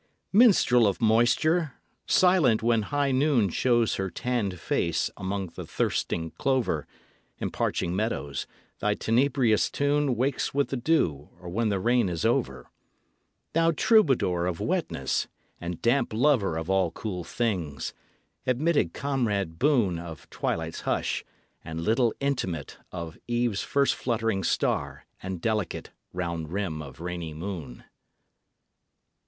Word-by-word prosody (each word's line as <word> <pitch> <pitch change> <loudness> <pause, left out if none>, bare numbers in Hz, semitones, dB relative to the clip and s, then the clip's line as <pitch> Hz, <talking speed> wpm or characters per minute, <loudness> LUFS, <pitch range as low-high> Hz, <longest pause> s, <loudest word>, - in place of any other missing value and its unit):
Minstrel 185 - +6
of 100 - -1
moisture! 125 +8 +3 0.3
silent 165 -12 +4
when 115 -1 +3
high 140 +5 0
noon 130 -6 +3
Shows 120 +4 +2
her 95 0 -2
tanned 105 -6 -2
face - - 0
among 95 -1 -3
the - - -8
thirsting 80 -1 -1
clover 130 -3 0 0.5
And - - -3
parching 90 0 -1
meadows, 95 -9 -2 0.3
thy 105 0 +1
tenebrious 120 -1 +2
tune 145 -2 +1
Wakes 135 +3 -1
with 140 0 +1
the - - -2
dew 120 - +1
or 90 -1 -8
when 110 +5 0
the 100 -2 0
rain 120 -1 +2
is 85 -2 -2
over. 65 -1 0 0.8
Thou 165 0 +3
troubadour 135 - +3
of 85 -2 -3
wetness - - -1 0.3
and 85 -1 -5
damp 120 0 +2
lover 115 - +2
Of 80 0 -4
all 95 -2 +2
cool 90 +1 -5
things! 85 - -2 0.5
admitted 130 - +2
comrade 105 -12 -1
boon 120 - +2
Of 85 -2 -9
twilight's 80 0 -3
hush, - - -1 0.4
and 80 +1 -5
little 115 +7 +2
intimate 95 - -2
Of 85 -2 -7
eve's 120 -4 0
first 140 -1 +2
fluttering 115 -5 -1
star - - -1 0.2
and 95 -1 -4
delicate 105 -2 -2 0.2
Round 85 -3 -4
rim 90 -5 -2
of 70 +1 -10
rainy 85 -3 -5
moon! 80 -7 -6
110 Hz, 130 wpm, -27 LUFS, 85-130 Hz, 0.8 s, Minstrel